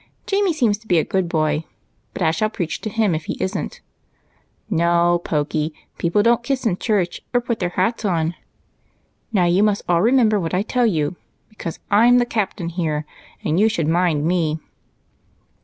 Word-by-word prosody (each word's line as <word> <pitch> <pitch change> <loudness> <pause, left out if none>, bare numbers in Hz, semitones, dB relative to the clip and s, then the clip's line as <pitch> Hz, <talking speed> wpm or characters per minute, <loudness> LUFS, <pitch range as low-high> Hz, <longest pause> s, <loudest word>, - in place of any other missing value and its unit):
Jamie 395 -2 +1
seems 235 -10 +1
to 220 - -21
be 180 - +3
a 160 - +3
good 190 -3 -1
boy, 155 -1 0 0.5
but - - -3
I 160 - +4
shall 215 +7 0
preach 175 -6 -4
to 215 - -3
him 215 -3 +1
if 155 0 -3
he - - -4
isn't. 190 +2 -3 0.9
No, 170 -2 +2
Pokey, 150 0 -1 0.2
people 175 +5 +2
don't 235 +1 +3
kiss 260 +1 -2
in 190 -6 +1
church 195 -6 -1
or - - +6
put 235 -1 -3
their 180 - 0
hats 190 +7 -1
on. 170 -4 0 1.0
Now 190 -5 +3
you 175 +3 +3
must 210 -1 +2
all 170 -1 +3
remember 225 -2 +4
what 165 -1 -2
I 190 - +1
tell 245 +2 +1
you, 165 -3 -1 0.3
because 170 -6 -6
I 215 +4 +6
'm 245 0 +6
the 245 - +3
cap 215 -5 -1
tain, 165 -4 -2 0.4
and 160 +4 +1
you 220 +2 +5
should 165 -8 -1
mind 165 -3 +2
me." 165 -3 +1
185 Hz, 185 wpm, -21 LUFS, 165-220 Hz, 1.0 s, or